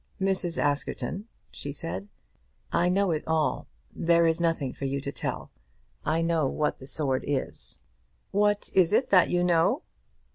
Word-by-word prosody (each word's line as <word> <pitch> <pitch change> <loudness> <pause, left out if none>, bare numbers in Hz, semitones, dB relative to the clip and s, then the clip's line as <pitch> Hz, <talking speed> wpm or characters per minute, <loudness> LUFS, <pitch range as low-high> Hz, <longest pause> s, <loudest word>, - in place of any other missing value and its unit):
"Mrs. 190 -3 0
Askerton," 145 +8 -1 0.2
she 145 - -6
said, 95 - -5 0.6
"I 175 +1 +2
know 195 0 +2
it 155 -2 -1
all. 160 -1 0 0.3
There 170 0 +3
is 165 +1 +2
nothing 165 -6 0
for 140 - -5
you 135 +1 -1
to 140 +1 -4
tell. - - -4 0.5
I 160 +2 +1
know 165 -4 +2
what 150 +3 -1
the 130 - -9
sword 135 -3 -1
is." 140 -2 -4 0.5
"What 205 +1 +1
is 185 -1 +4
it 255 - +2
that 185 -3 +6
you 175 0 +2
know?" 180 - +3
165 Hz, 155 wpm, -27 LUFS, 145-180 Hz, 0.6 s, that